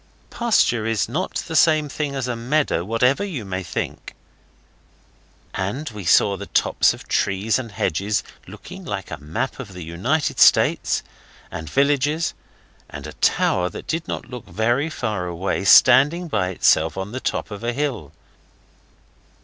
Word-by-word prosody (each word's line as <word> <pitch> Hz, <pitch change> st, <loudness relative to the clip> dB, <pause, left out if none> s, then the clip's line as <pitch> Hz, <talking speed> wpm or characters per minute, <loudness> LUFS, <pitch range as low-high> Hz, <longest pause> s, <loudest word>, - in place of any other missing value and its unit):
A -, -, -27 dB
pasture 120 Hz, -, +2 dB
is 115 Hz, -2 st, 0 dB
not 160 Hz, -, -3 dB
the 160 Hz, -, -5 dB
same 155 Hz, -1 st, +4 dB
thing 145 Hz, -1 st, -4 dB
as 135 Hz, -2 st, -2 dB
a 125 Hz, -, -2 dB
meadow, 125 Hz, -, 0 dB
whatever 125 Hz, -, +1 dB
you 160 Hz, -, -5 dB
may 95 Hz, -1 st, -3 dB
think. 85 Hz, -, -5 dB, 1.4 s
And 115 Hz, +10 st, -3 dB
we 105 Hz, -4 st, -8 dB
saw 100 Hz, +4 st, +4 dB
the -, -, -8 dB
tops -, -, +2 dB
of -, -, -14 dB
trees 100 Hz, +5 st, 0 dB
and 115 Hz, -4 st, -7 dB
hedges, 100 Hz, +2 st, -1 dB, 0.2 s
looking -, -, -11 dB
like -, -, -5 dB
the -, -, -6 dB
map 80 Hz, -, -4 dB
of 110 Hz, -8 st, -8 dB
the 90 Hz, -1 st, -8 dB
United 115 Hz, -, -1 dB
States, -, -, +4 dB, 0.5 s
and 80 Hz, -1 st, -6 dB
villages, 145 Hz, -, +1 dB, 0.6 s
and -, -, -8 dB
a -, -, -8 dB
tower 90 Hz, -1 st, +1 dB
that -, -, -9 dB
did 165 Hz, 0 st, -3 dB
not -, -, -5 dB
look 125 Hz, -2 st, -9 dB
very 120 Hz, +8 st, 0 dB
far 105 Hz, -, -3 dB
away 90 Hz, +3 st, -2 dB
standing 140 Hz, -, +6 dB
by 100 Hz, -, 0 dB
itself 80 Hz, -2 st, +2 dB
on 95 Hz, +2 st, -4 dB
the 130 Hz, -, -4 dB
top -, -, -3 dB
of 105 Hz, +2 st, -7 dB
a 120 Hz, -, 0 dB
hill. 120 Hz, -, -3 dB
115 Hz, 160 wpm, -22 LUFS, 95-145 Hz, 1.4 s, standing